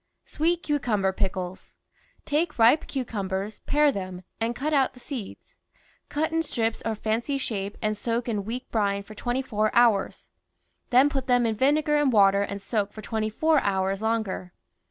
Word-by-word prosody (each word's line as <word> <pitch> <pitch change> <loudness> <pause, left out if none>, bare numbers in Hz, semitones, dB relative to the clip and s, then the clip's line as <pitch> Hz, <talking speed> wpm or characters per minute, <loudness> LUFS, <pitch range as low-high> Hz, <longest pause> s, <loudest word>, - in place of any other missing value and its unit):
SWEET 340 +3 0
CUCUMBER 215 -10 0
PICKLES 185 -2 -4 0.5
Take 310 +4 0
ripe 235 +7 +5
cucumbers, 205 -5 -3
pare 295 0 +4
them, 185 -5 -6 0.2
and 230 +1 -1
cut 300 +6 -2
out 270 -3 +2
the - - -14
seeds; 245 -6 -8 0.5
cut 315 +2 -1
in 325 0 +1
strips 230 -7 -2
or 225 -1 -1
fancy 230 +6 -1
shape 205 -6 -4
and 215 0 +1
soak 235 +3 -2
in 210 -4 -1
weak 240 +5 -5
brine 200 -2 0
for 215 - -12
twenty 245 +4 -2
four 215 -4 0
hours, 230 -5 +2 0.6
then 255 +3 +6
put 275 -3 -3
them 245 -1 +3
in 225 - +1
vine 280 +7 +3
gar 300 -1 +1
and 290 -3 +3
water 200 -2 +5
and 200 0 -4
soak 205 -1 -1
for 215 - -10
twenty 220 0 -2
four 310 +7 +3
hours 195 0 0
longer. 220 -5 -2
225 Hz, 175 wpm, -26 LUFS, 200-270 Hz, 0.6 s, then